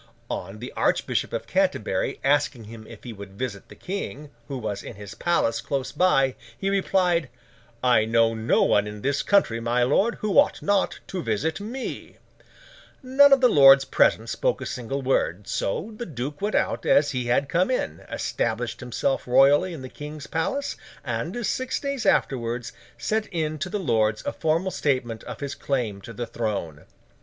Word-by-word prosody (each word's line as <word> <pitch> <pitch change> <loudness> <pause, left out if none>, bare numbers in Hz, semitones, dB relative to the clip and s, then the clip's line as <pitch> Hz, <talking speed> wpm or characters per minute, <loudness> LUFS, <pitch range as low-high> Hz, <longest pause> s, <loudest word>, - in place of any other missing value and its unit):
On 95 +3 -5
the 120 +3 -7
Archbishop - - 0
of - - -3
Canterbury, - - 0
asking 145 -3 +1
him 110 0 -11
if 115 - -12
he 120 - -7
would 100 -2 -10
visit 115 -6 -5
the - - -12
King, 150 -6 -6 0.2
who 140 - -4
was 110 -4 -4
in - - -9
his 100 +1 -9
palace 115 -7 0
close 135 0 -3
by, 135 -8 +3 0.2
he 195 0 -1
replied, 180 -6 +1 0.5
'I 120 -4 +4
know 115 0 +3
no 110 +1 +2
one 105 0 +3
in 105 0 -8
this 140 +1 +1
country, 195 - +2
my 120 +1 +1
lord, 195 - +2
who 210 -3 +2
ought - - +3
not 200 -1 +1
to 185 - -4
visit 120 +8 -1
me.' 245 +5 -6 0.9
None 275 +2 +6
of 275 -1 +6
the 250 - +7
lords 135 - +7
present - - +2
spoke - - 0
a - - -6
single 135 +3 -4
word; 105 -7 0
so, 195 - -2
the 240 +2 -6
duke 145 +2 -5
went 210 +1 -1
out - - 0
as 145 0 +4
he 125 -2 -2
had 125 +3 +2
come 175 - +1
in, 80 - -1
established - - -2
himself 125 +2 -2
royally 140 +8 +5
in 155 -6 -7
the - - -6
King's 150 +2 -8
palace, 275 +13 -2 0.3
and, 240 -2 -3
six 260 +6 -1
days 280 -3 -2
afterwards, 120 -2 0 0.2
sent 215 0 -1
in 155 -2 -2
to 185 +5 -3
the 210 - -2
Lords 110 - +1
a - - -2
formal 165 +4 0
statement 125 -8 -1
of - - -8
his 140 -1 -3
claim 115 -8 -2
to 115 - -9
the 120 +2 -4
throne. 100 -11 -4
135 Hz, 180 wpm, -25 LUFS, 115-180 Hz, 0.9 s, the